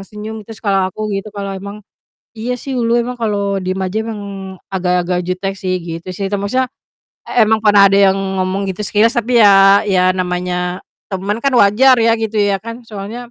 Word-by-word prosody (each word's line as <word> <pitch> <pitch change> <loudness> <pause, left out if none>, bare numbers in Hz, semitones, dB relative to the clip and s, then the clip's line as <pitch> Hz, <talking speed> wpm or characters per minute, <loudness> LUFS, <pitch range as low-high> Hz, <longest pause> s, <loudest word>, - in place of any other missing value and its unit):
senyum," 215 +1 -7
terus 225 -1 -10
kalau 195 -2 +2
aku 215 -1 -4
gitu, 195 +2 -5
"Kalau 200 -1 -5
emang 200 +2 -9 0.6
iya 240 +3 -2
sih, 270 +2 -6
ulu 235 0 +2
emang 245 +1 -5
kalau 200 -3 -1
diem 185 +1 -3
aja 190 +3 -2
emang 220 -2 -5 0.5
agak-agak 180 -1 0
jutek 195 +2 -3
sih," 185 -1 -2
gitu 165 +1 -7
sih, 195 +1 -3
te 205 - -1
maksudnya, 250 +6 -1 0.6
e 235 -3 +4
emang 220 0 +3
pernah 205 -2 +6
ada 195 - +4
yang 195 - -1 0.2
ngomong 190 +2 -1
gitu 190 +3 -5
sekilas, 220 +3 +2
tapi 240 +1 +1
ya 195 -1 +6
ya 185 -2 +3
namanya 180 0 -2 0.3
temen 195 +3 -2
kan 275 -1 +1
wajar 245 +4 +5
ya 230 - +4
gitu 220 -1 -3
ya 200 -1 +1
kan, 230 +2 -8
soalnya, 225 +4 -8
200 Hz, 190 wpm, -16 LUFS, 190-225 Hz, 0.6 s, pernah